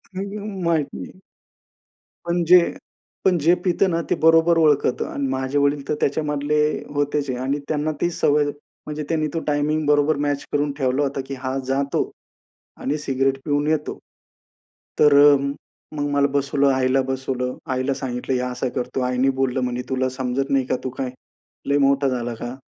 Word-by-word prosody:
माहीत 195 -5 -2
नाही. 185 - -9 1.1
पण 175 0 +1
जे, 180 +2 +8 0.7
पण 185 -2 +4
जे 165 +3 +4
पित 180 +1 +2
ना, 170 -1 0
ते - - +2
बरोबर 165 +1 +5
ओळखत 150 -5 +3
आणि 140 -1 -2
माझे 130 +1 -1
वडील 140 0 +1
तर 150 - +1
त्याच्यामधले 150 0 0 0.3
होतेच 145 0 -1
आहे 125 - -2
आणि 135 +3 -1
त्यांना 155 0 -1
ती 175 - +2
सवय, 150 -2 +2 0.4
म्हणजे 150 0 -4
त्यांनी 155 -2 +1
तो 165 - -1
टायमिंग 150 +1 0
बरोबर 150 +1 +3
मॅच 145 -1 -1
करून 145 0 +1
ठेवला 130 0 +1
होता 140 0 -2
की 140 - -5
हा 130 +1 -2
जातो 140 +1 0 0.7
आणि 145 +3 -1
सिगारेट 135 -1 0
पिऊन 145 0 0
येतो. 155 -1 -1 1.0
तर 150 -1 +6
अ, 145 0 +8 0.6
मग 145 0 -1
मला 140 0 +3
बसवलं, 140 0 +2
आईला 130 0 +2
बसवलं, 130 -1 -2 0.2
आईला 130 +1 0
सांगितलं 130 -2 -4
हे 125 - 0
असा 125 +1 -2
करतो. 125 +1 -2
आईने 125 +1 +1
बोललं 130 -1 +1
म्हणे 125 0 -2
तुला 130 -1 0
समजत 130 +1 -2
नाही 135 -1 +2
का? - - 0
तू 130 - -2
काय 130 -2 -2 0.6
लय 140 0 +3
मोठा 140 0 +3
झाला 120 -2 -2
का? 120 +2 -6
140 Hz, 165 wpm, -22 LUFS, 130-150 Hz, 1.1 s, जे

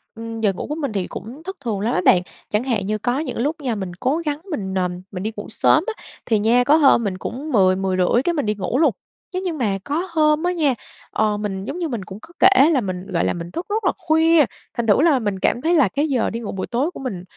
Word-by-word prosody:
Ừm, 225 0 -6
giờ 205 -3 +2
ngủ - - -6
của 300 - -3
mình 285 -6 -3
thì 195 -3 -2
cũng 255 +8 -9
thất 380 +3 -6
thường 225 -7 -3
lắm 225 +5 0
á - - +1
bạn, 180 - +6 0.3
chẳng 210 +3 0
hạn 230 -7 -1
như 215 +2 -1
có 245 +5 -1
những 315 - -4
lúc 290 +7 0
nha 250 -5 -1
mình 190 -3 -4
cố 275 +4 +1
gắng 295 0 -2
mình, 195 -10 -3
ờm, 180 -1 -1
mình 185 -1 -5
đi 215 - -2
ngủ 205 - -5
sớm 310 +7 +3
á, 455 - -5 0.2
thì 220 -3 +2
nha 235 +4 +4
có 285 +4 +5
hôm 275 -6 +5
mình 195 -3 -2
cũng 275 +10 -5
10:00-10:30 190 0 +3
cái 345 - +1
mình 290 -6 -1
đi 210 0 0
ngủ 200 +5 -2
luôn. 305 -2 +4 0.4
Thế 365 - -1
nhưng 355 -4 -3
mà 210 -7 0
có 320 - -2
hôm 305 -1 +3
á 355 - +2
nha, 305 -6 +2 0.4
ờ, 210 -1 +1
mình 195 -2 -4
giống 350 - -5
như 340 - -1
mình 235 -9 -4
cũng 190 - -9
có 340 - -15
kể 380 -6 +6
là 290 -6 +2
mình, 185 -2 -5
gọi 170 -3 0
là, - - +1
mình 170 0 -7
thức 340 - -4
rất 430 +2 -1
là - - +4
khuya, 320 -1 +4 0.3
thành 235 -1 -2
thử 210 +5 +5
là 305 -5 +4
mình 205 -4 -2
cảm 240 - +1
thấy 330 +4 +2
là 300 -9 +5
cái 285 +10 -1
giờ 260 -6 +1
đi 230 - -4
ngủ 225 - -5
buổi 190 - -4
tối 265 +8 0
của - - -10
mình, 205 -10 -5
240 Hz, 275 wpm, -21 LUFS, 200-305 Hz, 0.4 s, bạn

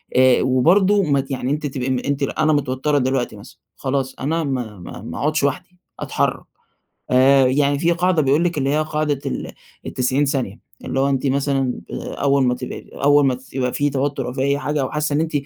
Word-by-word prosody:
آآ، 130 0 +5
وبرضو 185 +11 +3
ما 140 -5 +2
ت 135 +1 -12
يعني 130 0 -2
أنتِ 150 +1 -2
تبقي 130 -2 -3
ام 130 -1 0
أنتِ 140 0 -1
أنا 155 +3 +1
متوترة 145 +1 0
دلوقتي 130 -2 0
مثلًا، - - -14 0.2
خلاص 135 -1 -2
أنا 160 +5 -1
ما 125 -8 -4
ما 90 - -9
ما 80 - -7
أقعدش 155 +1 0
وحدي، 180 +6 -2 0.2
أتحرك. - - -1 0.7
آآ، 130 +1 +5
يعني 140 +2 +2
في 170 +2 +2
قاعدة 175 -1 +2
بيقول 145 +3 +2
لِك 175 -2 -1
اللي 135 -1 0
هي 150 +2 +2
قاعدة 150 -2 -1
ال 135 - -4 0.3
ال90 130 +3 0
ثانية، 130 -8 -2 0.3
اللي 135 - -2
هو 135 +1 +2
أنتِ 135 0 0
مثلًا 135 -1 0
آآ، - - -5
أول 140 -1 +2
ما 125 0 +2
تبقي - - -8
أول 145 +1 +4
ما 130 - +3
ت 130 +1 -16
يبقى 125 -1 -1
في 145 0 +1
توتر 140 -1 -2
أو 125 - -4
في 130 - -3
أي 140 +1 +1
حاجة 150 0 -1
أو 130 - -2
حاسة 150 -1 -1
إن - - +2
أنتِ 160 0 -2
140 Hz, 215 wpm, -20 LUFS, 130-150 Hz, 0.7 s, آآ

